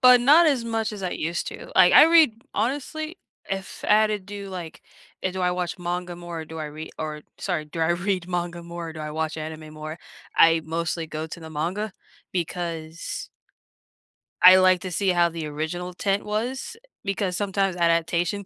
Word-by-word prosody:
but 250 Hz, -2 st, +8 dB
not 305 Hz, +7 st, +7 dB
as 265 Hz, -6 st, +2 dB
much 225 Hz, -1 st, -1 dB
as 205 Hz, -, -7 dB
I 180 Hz, -, -1 dB
used 170 Hz, +2 st, -2 dB
to, -, -, -9 dB
like, 180 Hz, -1 st, +7 dB
I -, -, +10 dB
read 315 Hz, -9 st, +5 dB
honestly, 310 Hz, -, -2 dB, 0.3 s
if 195 Hz, 0 st, -5 dB
I -, -, -3 dB
had 215 Hz, +1 st, +6 dB
to 210 Hz, -, -1 dB
do, 200 Hz, +1 st, -8 dB
like, 175 Hz, -3 st, -7 dB, 0.4 s
eh, 185 Hz, -, 0 dB
do 190 Hz, 0 st, -5 dB
I 180 Hz, -, +2 dB
watch 180 Hz, +1 st, -3 dB
manga 175 Hz, 0 st, -3 dB
more, 175 Hz, -1 st, -6 dB
or -, -, -6 dB
do 160 Hz, +1 st, -9 dB
I 155 Hz, -, -3 dB
re 155 Hz, +1 st, -8 dB
or 150 Hz, -1 st, -4 dB, 0.2 s
sorry, 175 Hz, -5 st, -2 dB
do 165 Hz, +2 st, -6 dB
I 160 Hz, +1 st, +3 dB
read 180 Hz, 0 st, -1 dB
manga 175 Hz, -1 st, -3 dB
more, 170 Hz, -1 st, -6 dB
do 155 Hz, -, -8 dB
I 150 Hz, 0 st, -4 dB
watch 155 Hz, 0 st, -2 dB
anime 155 Hz, 0 st, -7 dB
more? 155 Hz, +1 st, -7 dB, 0.4 s
I 165 Hz, 0 st, +6 dB
mostly 165 Hz, 0 st, -2 dB
go 155 Hz, +1 st, -5 dB
to 165 Hz, -, -9 dB
the 160 Hz, -, -9 dB
manga, 185 Hz, +7 st, -2 dB, 0.4 s
because 170 Hz, -2 st, -4 dB, 1.2 s
I 185 Hz, +1 st, +11 dB
like 185 Hz, -1 st, +5 dB
to 185 Hz, -, -5 dB
see 195 Hz, +3 st, +1 dB
how 175 Hz, -1 st, +4 dB
the 165 Hz, -2 st, -5 dB
original 160 Hz, +4 st, -4 dB
tent 195 Hz, +2 st, 0 dB
was, 240 Hz, -, -3 dB
eh, -, -, -25 dB, 0.2 s
because 195 Hz, -2 st, -1 dB
sometimes 195 Hz, -2 st, 0 dB
adaptation 170 Hz, +3 st, +1 dB
175 Hz, 195 wpm, -25 LUFS, 160-200 Hz, 1.2 s, I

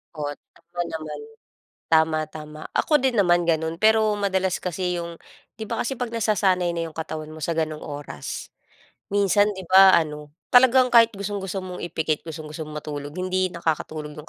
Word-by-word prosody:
Oo, 145 Hz, -1 st, -3 dB, 0.2 s
tama 175 Hz, +1 st, -7 dB
naman. 155 Hz, -1 st, -6 dB, 0.7 s
Tama, 160 Hz, -1 st, +4 dB
tama. 155 Hz, 0 st, -10 dB, 0.2 s
Ako 300 Hz, -1 st, +3 dB
din 260 Hz, -2 st, +1 dB
naman 175 Hz, -3 st, +3 dB
gano'n 160 Hz, +1 st, 0 dB
pero 220 Hz, -1 st, +4 dB
madalas 190 Hz, -2 st, 0 dB
kasi 180 Hz, 0 st, -2 dB
'yong 170 Hz, 0 st, -7 dB, 0.4 s
'di 220 Hz, -, -5 dB
ba 230 Hz, +1 st, -2 dB
kasi 265 Hz, +1 st, -3 dB
'pag 240 Hz, -2 st, -4 dB
nasasanay 195 Hz, -5 st, +1 dB
na 165 Hz, -, -2 dB
'yong 160 Hz, -, -9 dB
katawan 155 Hz, -1 st, -5 dB
mo 155 Hz, -, -10 dB
sa 165 Hz, +3 st, -1 dB
gano'ng 155 Hz, -1 st, -2 dB
oras, 145 Hz, -, -7 dB, 0.6 s
minsan, 205 Hz, +1 st, +3 dB
'di 190 Hz, -2 st, -7 dB
ba, 190 Hz, +1 st, +8 dB
ano, 150 Hz, -2 st, -4 dB, 0.2 s
talagang 255 Hz, 0 st, +6 dB
kahit 230 Hz, -1 st, +7 dB
gustong-gusto 200 Hz, -1 st, -4 dB
mong 180 Hz, -1 st, -7 dB
ipikit, 160 Hz, -3 st, -2 dB
gustong-gusto 155 Hz, -1 st, -7 dB
mong 150 Hz, -, -6 dB
matulog, 145 Hz, -1 st, -6 dB
hindi 185 Hz, 0 st, 0 dB
nakakatulog 155 Hz, -3 st, -3 dB
'yong 150 Hz, +2 st, -11 dB
175 Hz, 170 wpm, -24 LUFS, 155-200 Hz, 0.7 s, ba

